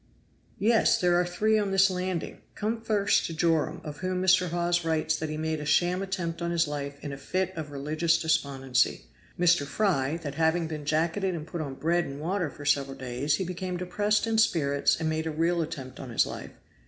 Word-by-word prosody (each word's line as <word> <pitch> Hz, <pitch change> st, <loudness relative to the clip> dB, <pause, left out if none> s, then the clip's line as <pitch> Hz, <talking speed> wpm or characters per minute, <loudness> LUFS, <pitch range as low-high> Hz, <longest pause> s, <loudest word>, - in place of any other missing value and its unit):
"Yes! 225 Hz, +2 st, +3 dB
there 180 Hz, -3 st, +3 dB
are -, -, 0 dB
three 215 Hz, +5 st, +2 dB
on 205 Hz, -1 st, 0 dB
this 195 Hz, 0 st, +4 dB
landing. 180 Hz, -2 st, -3 dB
Come 225 Hz, +2 st, -2 dB
first 210 Hz, -3 st, +2 dB
to 165 Hz, -, -6 dB
Joram, 160 Hz, 0 st, +1 dB
of 150 Hz, -2 st, -7 dB
whom 185 Hz, 0 st, -2 dB
Mr. 185 Hz, -1 st, +4 dB
Hawes 175 Hz, 0 st, 0 dB
writes 160 Hz, -1 st, +1 dB
that 155 Hz, 0 st, -4 dB
he 155 Hz, -, -4 dB
made 160 Hz, 0 st, -2 dB
a -, -, -5 dB
sham 175 Hz, +5 st, +2 dB
attempt 180 Hz, -4 st, -3 dB
on 170 Hz, -, -1 dB
his 170 Hz, -2 st, +1 dB
life 140 Hz, -1 st, -4 dB
in 145 Hz, -2 st, -4 dB
a 135 Hz, -, -8 dB
fit 185 Hz, +6 st, -2 dB
of 155 Hz, -2 st, -5 dB
religious 155 Hz, +4 st, 0 dB
despondency 135 Hz, -5 st, +1 dB, 0.3 s
Mr. 175 Hz, -3 st, +4 dB
Fry, 155 Hz, -3 st, 0 dB
that 145 Hz, -2 st, -4 dB
having 160 Hz, +2 st, +1 dB
been 155 Hz, -2 st, -6 dB
jacketed 170 Hz, +5 st, 0 dB
and 155 Hz, -2 st, -5 dB
put 170 Hz, 0 st, -5 dB
on 140 Hz, -3 st, -5 dB
bread 170 Hz, +4 st, +1 dB
and 140 Hz, +1 st, -7 dB
water 175 Hz, +1 st, -1 dB
for 145 Hz, -, -11 dB
several 140 Hz, -2 st, +1 dB
days, 130 Hz, +3 st, -1 dB
he 190 Hz, -, -2 dB
became 180 Hz, 0 st, -4 dB
depressed 205 Hz, +5 st, 0 dB
in 225 Hz, -1 st, +1 dB
spirits 145 Hz, -11 st, +2 dB
and 160 Hz, -, -1 dB
made 160 Hz, 0 st, -1 dB
a -, -, 0 dB
real 165 Hz, +2 st, +1 dB
attempt 145 Hz, -5 st, -6 dB
on 130 Hz, -, -7 dB
his 115 Hz, -, +2 dB
life. -, -, -7 dB
165 Hz, 210 wpm, -28 LUFS, 150-185 Hz, 0.3 s, this